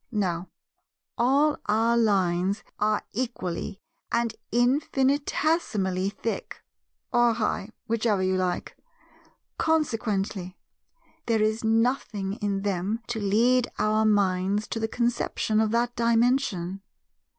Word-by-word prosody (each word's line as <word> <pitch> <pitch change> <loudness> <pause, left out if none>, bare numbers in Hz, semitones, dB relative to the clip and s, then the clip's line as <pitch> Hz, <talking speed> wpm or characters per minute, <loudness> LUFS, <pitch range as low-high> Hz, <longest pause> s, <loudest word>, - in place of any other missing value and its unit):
Now, 185 -5 -1 0.7
all 280 +5 +3
our 225 +3 +3
lines 195 -3 +1 0.2
are 210 0 +1
equally 205 -5 -3 0.3
and 235 -1 +1 0.2
infinitesimally 260 - +1
thick 215 +3 -5 0.5
(or 240 -1 +4
high, 215 -2 -1 0.2
whichever 220 -4 +1
you 185 0 +1
like); 185 -1 -2 0.8
consequently, 215 - -1 0.7
there 225 -2 +2
is 215 +1 0
nothing 225 -3 0
in 200 -3 -2
them 200 +3 -1
to 235 -2 -2
lead 235 +5 +3
our 215 +1 +2
minds 200 -1 +2
to 225 - -2
the 220 - 0
conception 235 -2 0
of 220 -1 +2
that 240 +2 0
Dimension. 230 -6 +1
220 Hz, 105 wpm, -26 LUFS, 195-240 Hz, 0.8 s, or